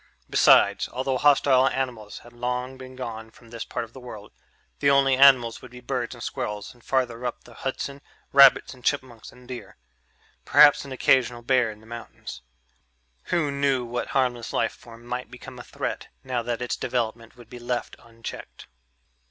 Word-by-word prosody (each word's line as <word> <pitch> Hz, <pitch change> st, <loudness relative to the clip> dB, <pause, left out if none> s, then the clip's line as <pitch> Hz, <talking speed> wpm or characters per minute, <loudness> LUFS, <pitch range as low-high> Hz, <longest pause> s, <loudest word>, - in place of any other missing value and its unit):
Besides, -, -, +5 dB
although 130 Hz, 0 st, -2 dB
hostile 135 Hz, -2 st, +4 dB
animals 120 Hz, -7 st, -3 dB
had 120 Hz, -, -15 dB
long 125 Hz, +2 st, -3 dB
been 130 Hz, 0 st, -11 dB
gone 115 Hz, -3 st, -6 dB
from 115 Hz, 0 st, -19 dB
this 115 Hz, -1 st, -5 dB
part 120 Hz, -, -4 dB
of 115 Hz, -, -21 dB
the 130 Hz, -, -10 dB
world 110 Hz, -4 st, -10 dB, 0.5 s
the 140 Hz, -, +3 dB
only 135 Hz, -1 st, +4 dB
animals 130 Hz, -4 st, +5 dB
would 125 Hz, -, -11 dB
be 125 Hz, +1 st, -12 dB
birds 125 Hz, -1 st, -3 dB
and 120 Hz, -, -9 dB
squirrels 105 Hz, -6 st, -5 dB
and, 120 Hz, -2 st, -23 dB
farther 125 Hz, -3 st, -1 dB
up 125 Hz, -, -4 dB
the 120 Hz, -, -15 dB
Hudson, 140 Hz, +2 st, -5 dB, 0.3 s
rabbits 140 Hz, -1 st, +7 dB
and 125 Hz, -1 st, -17 dB
chipmunks 130 Hz, -5 st, -2 dB
and 125 Hz, 0 st, -18 dB
deer... 125 Hz, -1 st, -9 dB, 0.7 s
perhaps 145 Hz, -1 st, +6 dB
an 140 Hz, -, -10 dB
occasional 125 Hz, -2 st, +2 dB
bear 125 Hz, -2 st, +2 dB
in 105 Hz, 0 st, -10 dB
the -, -, -18 dB
mountains 115 Hz, 0 st, -9 dB, 0.8 s
who 160 Hz, -5 st, 0 dB
knew 140 Hz, -3 st, 0 dB
what 120 Hz, +1 st, -3 dB
harmless 125 Hz, -3 st, -1 dB
life 115 Hz, -1 st, 0 dB
form 120 Hz, -1 st, -15 dB
might 125 Hz, +1 st, -5 dB
become 125 Hz, 0 st, -11 dB
a -, -, -8 dB
threat -, -, -5 dB, 0.2 s
now 125 Hz, -2 st, -2 dB
that 120 Hz, +1 st, -3 dB
its 125 Hz, -, -2 dB
development 115 Hz, -1 st, -3 dB
would 120 Hz, -2 st, -14 dB
be 125 Hz, +1 st, -10 dB
left 120 Hz, 0 st, -3 dB
unchecked? 115 Hz, 0 st, -10 dB
125 Hz, 175 wpm, -25 LUFS, 115-130 Hz, 0.8 s, rabbits